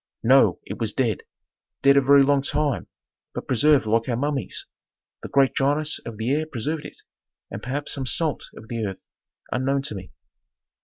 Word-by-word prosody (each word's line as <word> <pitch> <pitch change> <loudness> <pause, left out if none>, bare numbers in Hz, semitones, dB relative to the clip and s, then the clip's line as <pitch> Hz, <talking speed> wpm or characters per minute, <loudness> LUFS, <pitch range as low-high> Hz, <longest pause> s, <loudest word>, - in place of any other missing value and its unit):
"No, 115 -6 +5
it 100 - -7
was 110 -2 -2
dead. 115 -7 0 0.6
Dead 140 0 +6
a 140 - +6
very 140 +1 +6
long 140 0 +3
time, 145 -1 -1 0.5
but - - -4
preserved 140 +1 +3
like 115 +3 +1
our 120 - 0
mummies. 145 +1 -2 0.6
The - - -7
great 135 -1 +3
dryness 145 +3 +1
of 115 -2 -7
the 110 +4 -1
air 155 +2 0
preserved 150 +3 -3
it, - - -10 0.5
and 95 - -6
perhaps 140 +4 -3
some 135 -3 -4
salt 155 +1 -1
of 110 - -12
the 115 0 -3
earth 95 -2 -5 0.5
unknown 135 +2 0
to 140 - -1
me. 95 -2 -8
135 Hz, 175 wpm, -24 LUFS, 115-145 Hz, 0.6 s, Dead